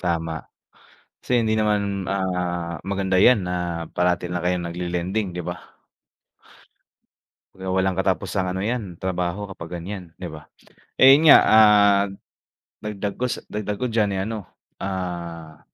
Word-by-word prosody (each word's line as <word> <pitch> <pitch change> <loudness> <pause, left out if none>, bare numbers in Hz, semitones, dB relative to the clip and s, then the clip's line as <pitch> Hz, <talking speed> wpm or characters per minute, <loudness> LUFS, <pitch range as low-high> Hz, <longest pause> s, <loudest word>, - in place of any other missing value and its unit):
Tama, 85 -2 -1 0.9
kasi - - -5
hindi 110 - +1
naman, 100 -2 0
ah, 90 -3 -2
maganda 95 -1 0
'yan 120 -6 +5
na 90 - -3 0.4
parati 90 0 +1
lang 90 0 -3
kayong 90 -1 0
nagle-lending, 90 +2 -3
'di 90 - -3
ba. - - -4 2.0
Kaya 95 0 -9
walang 95 0 0
katapusang 95 0 0
ano 95 +1 -2
'yan, 110 -5 -3
trabaho 90 +1 -2
kapag 85 -2 -7
ganiyan, 90 -3 -8
'di 90 - -7
ba. 75 -1 -11 0.5
Eh, 135 +2 +8
'yon 160 - +1
nga, 150 - +10
ah, 105 -2 +6 0.8
dagdag 105 -1 -4
ko 125 - +1
sa - - -4
dagdag 105 0 -3 0.2
diyan, 110 -2 +2
eh, - - -1
ano, 105 -2 -5 0.3
ah, 85 -4 -5
95 Hz, 135 wpm, -23 LUFS, 90-105 Hz, 2.0 s, nga